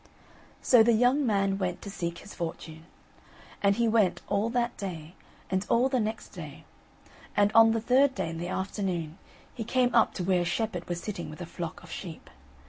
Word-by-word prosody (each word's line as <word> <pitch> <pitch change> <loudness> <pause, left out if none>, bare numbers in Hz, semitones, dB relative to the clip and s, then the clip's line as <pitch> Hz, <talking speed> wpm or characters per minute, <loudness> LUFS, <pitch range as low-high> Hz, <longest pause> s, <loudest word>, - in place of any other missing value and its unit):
So 245 -3 +6
the 235 +1 +5
young 250 +5 +3
man 195 -2 +1
went 180 -2 -2
to 200 - -7
seek 170 -3 -4
his 205 - -11
fortune. 165 -1 -6 0.7
And 200 0 +3
he 235 +1 +2
went 215 -4 +3
all 205 +2 0
that 240 0 -1
day, 170 -4 -6 0.4
and 190 0 +1
all 245 +3 +3
the 260 -2 +1
next 220 0 -3
day; - - -10 0.7
and 205 0 +4
on 225 0 +8
the 225 - -1
third 265 +4 +3
day, 165 - -2
in 165 - -6
the 175 - -4
afternoon, 185 -4 -3 0.3
he 230 - -5
came 245 +1 +1
up 230 -2 +4
to 180 - -3
where 180 0 +2
a - - -1
shepherd 180 0 -2
was 175 -1 -2
sitting 175 -7 -5
with 155 - -10
a 175 - -5
flock 170 -1 -7
of - - -12
sheep. 170 -5 -8
200 Hz, 200 wpm, -28 LUFS, 175-230 Hz, 0.7 s, on